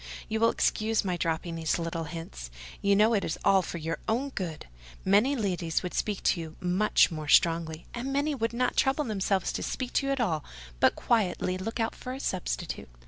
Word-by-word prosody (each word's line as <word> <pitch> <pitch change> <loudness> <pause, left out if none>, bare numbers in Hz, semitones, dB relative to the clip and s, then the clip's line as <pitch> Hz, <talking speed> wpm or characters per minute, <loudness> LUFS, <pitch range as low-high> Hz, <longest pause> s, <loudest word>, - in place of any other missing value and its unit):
You 220 0 -1
will 230 +1 +5
excuse 220 -1 +1
my 180 -2 0
dropping 165 0 -2
these 165 -1 0
little 165 -1 -3
hints: 150 - -7 0.3
you 200 0 +4
know 215 +3 +5
it 205 - +2
is 160 - -2
all 195 -1 +6
for 170 - -5
your 165 0 -3
own 250 +6 +1
good. 175 - -5 0.4
Many 210 +9 +4
ladies 185 -8 -1
would 180 - -4
speak 210 -3 -1
to 175 - +2
you 160 -1 -8
much 185 +3 +3
more 155 -2 -5
strongly; 165 +1 +3
and 245 +3 -3
many 285 +2 +1
would 230 -4 -1
not 245 +1 0
trouble 270 +2 +2
themselves 195 -5 0
to - - -3
speak 255 +2 -1
at 275 0 0
all, 165 -11 0 0.4
but - - +4
quietly 185 -5 +1
look 225 +5 -4
out 225 - 0
for 255 - -7
a - - -7
substitute. - - -3
195 Hz, 195 wpm, -28 LUFS, 165-230 Hz, 0.4 s, all